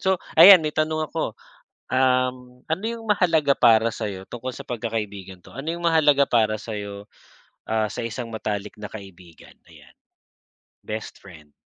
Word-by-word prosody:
So, 190 -1 +1 0.2
ayan 185 -4 +10
may 150 - -2
tanong 155 0 -1
ako, - - -3 0.6
um, 125 -1 0
ano 165 +5 -3
yung 230 -1 -7
mahalaga 165 -8 +3
para 115 -1 +5
sa'yo, 95 -2 -5
tungkol 125 +2 -6
sa - - -9
pagkakaibigan 105 -6 -5
'to, - - -15
ano 135 +5 -6
yung 170 0 -6
mahalaga 150 -4 +4
para 110 -2 +2
sa'yo, 100 -2 -7 0.6
ah, 110 -1 -1
sa - - -7
isang 115 +1 -6
matalik 105 -2 -4
na 105 - -6
kaibigan? 95 -5 -13
Ayan. - - -18 0.9
Best 110 0 -7
friend. 80 -6 -15
115 Hz, 150 wpm, -23 LUFS, 105-150 Hz, 0.9 s, ayan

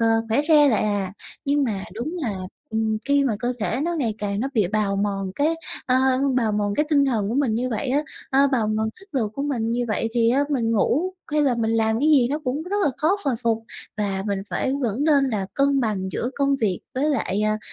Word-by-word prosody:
ờ, 230 - +3 0.2
khỏe 230 +6 +2
re 295 -2 +6
lại 225 - +2
à. 200 -3 -1 0.3
Nhưng 285 0 +2
mà 205 -6 -2
đúng 270 +11 -4
là, 225 -5 -1 0.4
ừm, 220 0 0
khi 280 0 +4
mà 235 -5 +1
cơ 245 +2 -1
thể 235 +4 -1
nó 345 +1 -1
ngày 245 -9 -1
càng 200 0 -2
nó 265 - -1
bị 215 -5 +3
bào 205 -1 0
mòn 195 -2 -1
cái, 305 +3 +1 0.3
ờ, 255 - +2 0.4
bào 225 -4 +1
mòn 205 -1 0
cái 300 - +1
tinh 285 -2 +4
thần 225 -7 0
của 230 - -2
mình 265 -6 +1
như 245 +3 -1
vậy 230 +4 -2
á, 280 +4 +2 0.3
ờ, 275 +1 +5
bào 235 -5 +2
mòn 215 +1 0
sức 390 - -17
lực 225 -6 0
của 275 - -3
mình 240 -6 -1
như 245 +1 0
vậy 225 +1 0
thì 230 -1 +3
á 275 +4 +3
mình 235 -5 +1
ngủ 305 - +1 0.2
hay 300 - +3
là 270 -4 +2
mình 225 -1 0
làm 225 0 +2
cái 300 - +3
gì 260 -5 +5
nó 290 +3 -1
cũng 275 +4 -1
rất 380 +4 -3
là - - +3
khó 330 +6 +2
hồi 270 -3 +1
phục, 225 -1 0 0.3
và 195 -2 -1
mình 200 -1 -1
phải 265 - 0
vẫn 240 +2 -1
nên 285 -3 +4
là 200 -4 -2
cân 275 0 +2
bằng 205 -5 -1
giữa 245 - -2
công 280 0 +2
việc 205 -8 0
với 280 +4 +1
lại, 215 -6 0
à, 215 0 +1
235 Hz, 245 wpm, -23 LUFS, 215-280 Hz, 0.4 s, re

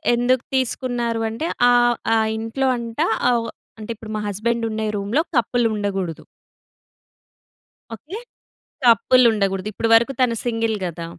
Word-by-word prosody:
ఎందుకు 245 +1 +1
తీసుకున్నారు 240 -2 -2
అంటే, 230 +9 -4 0.2
ఆహ్, 240 0 +4 0.2
ఆ - - +4 0.2
ఇంట్లో 225 +4 -2
అంట 230 -1 -7 0.3
అవ్ 230 -1 0 0.3
అంటే 215 +1 -6
ఇప్పుడు 220 0 -10
మా 210 - -3
హస్బెండ్ 230 +4 -1
ఉండే 220 0 -2
రూమ్‍లో 205 +10 0 0.2
కపుల్ 240 +1 +1
ఉండగూడదు. 195 -5 -3 1.7
ఓకే. 315 - -9 0.7
కపుల్ 250 +2 +5
ఉండగూడదు. 195 -2 -1
ఇప్పుడు 225 - -1
వరకు 235 +4 +3
తను 235 -2 +2
సింగిల్ 225 -2 0
గదా! 170 -1 -5
230 Hz, 130 wpm, -21 LUFS, 215-245 Hz, 1.7 s, కపుల్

